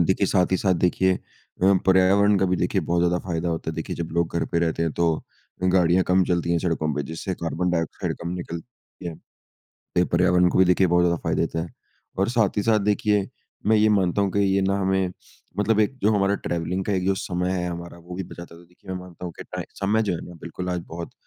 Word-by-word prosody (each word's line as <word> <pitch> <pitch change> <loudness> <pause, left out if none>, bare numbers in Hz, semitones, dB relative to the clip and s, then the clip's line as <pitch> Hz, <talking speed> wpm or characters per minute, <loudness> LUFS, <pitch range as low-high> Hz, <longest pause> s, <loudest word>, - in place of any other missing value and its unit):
देखिए 95 +1 +2
साथ 90 0 +2
ही - - +4
साथ 95 0 +2
देखिए 90 +2 +2 0.5
अ, 95 +1 +6
पर्यावरण 95 +2 +5
का - - +2
भी 90 0 +1
देखिए - - 0
बहुत 85 0 0
ज़्यादा 90 0 +2
फ़ायदा 85 -1 -1
होता 80 -1 -2
है। - - -7
देखिए 80 - -4
जब 85 -1 -3
लोग 85 0 0
घर 85 - +1
पे 85 - +2
रहते 85 -1 0
हैं 80 -2 0
तो 85 - +1 0.6
गाड़ियाँ 90 -1 +4
कम 95 0 +3
चलती 85 -1 0
हैं 85 - +2
सड़कों 80 -3 -1
पे, 75 - -1
जिससे 80 +5 -4
कार्बन 90 +2 -1
डाइऑक्साइड 80 -2 -2
कम 85 - -3
निकलती 90 +2 -8
है। 80 -2 -10 0.7
पर्यावरण 90 +1 +3
को - - 0
भी 95 - +6
देखिए 90 +1 +4
बहुत 90 0 +3
ज़्यादा 85 -1 +2
फ़ायदा - - 0
देता 80 - -1
है 85 - -5 0.5
और 100 - +2
साथ 110 -5 +1
ही 105 - +2
साथ 110 -2 +3
देखिए 105 0 +1 0.4
मैं 110 - +5
ये 110 +1 +4
मानता 100 -2 +2
हूँ 100 -2 +1
कि 100 - 0
ये 100 -1 +2
ना 95 +1 +1
हमें 95 -1 +1 0.5
मतलब 110 +1 +2
एक 110 +5 +1
जो 105 - +5
हमारा 100 0 +2
ट्रैवलिंग 85 +2 -1
का 105 - 0
एक 90 -1 0
जो 95 0 +2
समय 90 -1 -2
है 90 -1 -1
हमारा, 85 0 -7
वो 85 +1 -10
भी 95 - -3
बचाता 85 -1 -10
था। - - -14
तो 85 - -17
देखिए 90 +2 -12
मैं 95 - -3
मानता 90 0 -10
हूँ 85 - -6
कि - - -7
टाइ - - -6 0.2
समय 105 +3 +2
जो 100 -4 0
है 85 - -4
ना - - -10
बिल्कुल 90 +2 -5
आज 90 -1 -1
बहुत 85 +1 -7
90 Hz, 245 wpm, -24 LUFS, 85-95 Hz, 0.7 s, अ